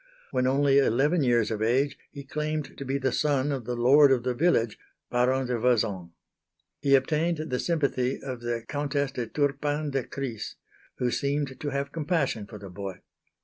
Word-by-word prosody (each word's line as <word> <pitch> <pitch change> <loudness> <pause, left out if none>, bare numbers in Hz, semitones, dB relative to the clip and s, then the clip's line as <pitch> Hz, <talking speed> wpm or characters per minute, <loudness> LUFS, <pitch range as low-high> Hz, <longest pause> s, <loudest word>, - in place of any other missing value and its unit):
When 130 -1 +1
only 140 +1 +4
eleven 140 +6 +2
years 120 -4 +2
of 110 -1 -2
age 130 +6 +2
he 140 - -9
claimed 150 +1 -3
to - - -6
be 135 +1 -1
the 130 -1 0
son 145 +1 +1
of 135 -5 -3
the 120 +1 -2
lord 135 +4 +6
of 125 -3 +2
the 125 0 0
village, 120 -6 +1 0.3
Baron 130 +2 +2
de 125 -1 -1
Vezins. 105 -7 +1 0.7
He 140 -1 +4
obtained 155 +5 +1
the 125 - 0
sympathy 140 -6 0
of 130 -3 -6
the 120 -1 -2
Countess 145 -1 -1
de 120 -3 -4
Turpin 145 +2 -1
de 135 -2 0
Crisse, 125 -5 -5 0.4
who 125 -1 0
seemed 140 -1 -1
to 145 - -3
have 140 0 -2
compassion 150 - -1
for 105 - -9
the 100 -2 -10
boy. 95 0 -7
135 Hz, 180 wpm, -27 LUFS, 120-145 Hz, 0.7 s, lord